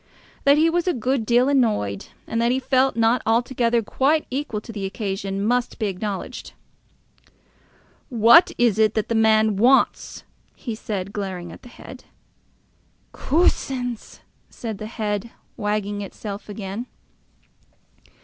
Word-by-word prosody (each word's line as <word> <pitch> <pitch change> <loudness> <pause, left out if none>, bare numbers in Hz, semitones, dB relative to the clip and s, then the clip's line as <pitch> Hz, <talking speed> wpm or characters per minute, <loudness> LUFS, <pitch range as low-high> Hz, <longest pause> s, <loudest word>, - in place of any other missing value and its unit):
That 280 +1 +6
he 315 +2 +4
was 345 +2 0
a 360 - +1
good 250 -1 -1
deal 245 +2 +4
annoyed, 215 - 0 0.2
and 230 - -2
that 235 +1 +2
he 255 - +1
felt 265 0 +2
not 230 +1 +2
altogether 235 0 +1
quite 285 +8 +1
equal 265 -5 -3
to 230 - -10
the 205 -3 -6
occasion, 195 0 -3
must 245 +2 0
be 220 - -2
acknowledged. 200 0 -5 1.6
"What 235 +7 +6
is 230 -4 +2
it 215 -1 +3
that 215 - -1
the - - 0
man 220 -2 +3
wants?" 250 +6 +2 0.3
he 235 - -6
said, 200 -3 -5
glaring 185 -4 -5
at - - -12
the 245 - -14
head. - - -12 1.1
"Coosins!" 260 -6 -1 0.3
said 220 -4 -6
the 215 - -6
head, 215 -1 -3 0.3
wagging 205 -1 -2
itself 200 +1 -7
again. 205 +3 -6
225 Hz, 135 wpm, -22 LUFS, 205-250 Hz, 1.6 s, That